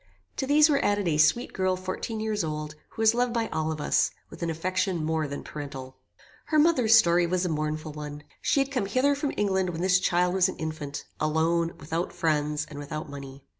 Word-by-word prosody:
To 265 - -2
these 300 +2 +6
were 285 -3 +2
added 205 -2 +1
a 150 -2 +1
sweet 155 +11 +3
girl 185 -1 +1
fourteen 185 +4 -4
years 215 -3 -1
old, 150 -1 -4 0.2
who 225 - -4
was 220 0 +6
loved 245 0 +1
by 230 -1 -1
all 160 0 -1
of 155 - -4
us, - - +2 0.2
with - - -11
an 170 - -1
affection 180 +1 -1
more 160 -1 0
than 140 0 -6
parental. 135 -3 -7 0.5
Her 310 - +1
mother's 275 -8 +5
story 175 -5 +5
was 180 +1 0
a - - 0
mournful 155 0 -2
one. 150 0 -7 0.2
She 280 - +2
had 275 +1 -2
come 250 -8 -1
hither 255 +7 +2
from 285 0 -2
England 190 -3 +1
when 170 -1 -4
this 185 0 +4
child 180 -1 +2
was 190 0 +3
an - - -5
infant, 155 -3 -5
alone, 165 +2 +1
without 165 +4 -3
friends, 150 -1 0
and 145 - -9
without 150 +1 -6
money. 140 -1 -9
170 Hz, 210 wpm, -27 LUFS, 155-210 Hz, 0.5 s, these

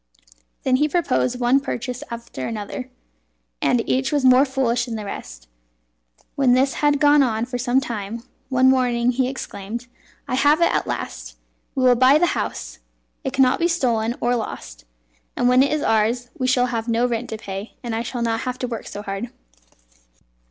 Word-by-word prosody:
He 260 - 0 0.2
then - - -10
proposed 255 -7 0
one 250 +2 +4
purchase 250 -2 -4
after 235 - -6
another, 225 +4 -5 0.7
and 240 -2 +1
each 265 +2 +1
was 290 -3 +1
more 255 +2 +6
foolish 255 -3 0
than 235 -3 -5
the 215 -1 -5
rest. - - -8 0.9
When 265 -3 +3
this 265 +2 +3
had 290 -1 +3
gone 295 -1 +5
on 230 -3 +1
for 245 0 -5
some 245 +1 +2
time, 230 -3 -5 0.3
one 260 -1 +3
morning 245 -2 +2
he 255 +1 0
exclaimed: 235 -3 -6 0.4
"I - - -4
have 290 +4 +4
it 340 - +3
at - - 0
last! - - -5 0.4
We 260 - 0
will 250 -1 +6
buy 260 +4 +5
the 345 - +3
house. - - -4 0.4
It 265 - -3
cannot 260 -1 +3
be 340 - +3
stolen 240 -9 0
or 245 +1 +2
lost, - - -6 0.5
and 245 - +1
when 250 +1 +5
it 280 - +2
is 305 -1 0
ours 230 +3 +1
we 255 - -1
shall 250 -1 +3
have 225 0 -2
no 235 +1 +2
rent 240 -1 -2
to 220 - -4
pay, 195 0 -7
and 235 -2 -4
I 225 - -1
shall 235 0 -4
not 225 -1 0
have 255 +1 -4
to 250 - -3
work 230 -2 -6
so 205 - -7
hard." 195 +4 -4
245 Hz, 185 wpm, -22 LUFS, 230-265 Hz, 0.9 s, more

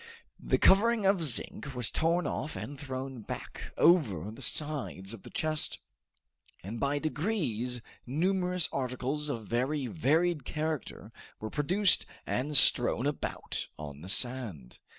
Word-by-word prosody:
The - - +1
covering 215 +2 +5
of 195 -2 +4
zinc 140 -1 -1
was 120 -2 -2
torn 170 +1 +1
off 150 - -3
and 145 - -6
thrown 130 -2 -6
back - - -7
over 110 - +4
the 110 - -11
sides 140 -10 -2
of 115 - -9
the - - -11
chest, 155 -1 -1 0.9
and 110 +5 -5
by 140 +1 +1
degrees 145 - -2 0.2
numerous 180 +4 +1
articles 135 +3 -2
of 115 -6 -4
very 130 +4 0
varied 160 +3 +1
character 150 -7 -4 0.3
were 110 - -5
produced 185 +7 +3 0.2
and 145 +3 +1
strewn 125 +1 +5
about 145 0 -3
on 75 -1 -8
the 90 - -8
sand. 110 - -1
140 Hz, 130 wpm, -30 LUFS, 120-160 Hz, 0.9 s, covering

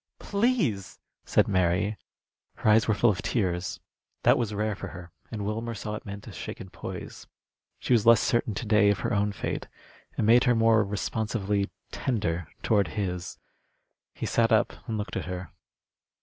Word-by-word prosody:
"Please!" 200 - 0 0.3
said - - +3
Mary. 95 +2 +1 0.6
Her 110 - +2
eyes 110 +1 +5
were 110 - +3
full 115 +3 +4
of 95 - -4
tears. 90 -6 -1 0.4
That - - +6
was 115 -4 -1
rare 105 +1 -1
for 100 - -6
her, 85 -2 -10 0.2
and 105 -2 -4
Wilmer 115 +2 -3
saw 105 +1 -5
it 105 - -7
meant 100 0 -7
a - - -9
shaken 95 - -7
poise. - - -8 0.5
She - - 0
was 115 -3 +4
less 115 -2 +8
certain 120 -3 +1
to 120 - -4
day 105 -1 +4
of 100 -3 +1
her 115 - -1
own 105 0 +1
fate. 100 - -4 0.5
It - - +1
made 115 +4 +6
her 125 -2 +4
more 115 -1 +4
responsively 105 0 -1 0.2
tender 85 - -1 0.2
toward 105 -3 +3
his. 90 -3 -3 0.8
He - - -4
sat - - +2
up - - +3
and 110 - -2
looked 105 +1 -4
at - - -3
her. 90 -3 -6
105 Hz, 175 wpm, -27 LUFS, 95-115 Hz, 0.8 s, less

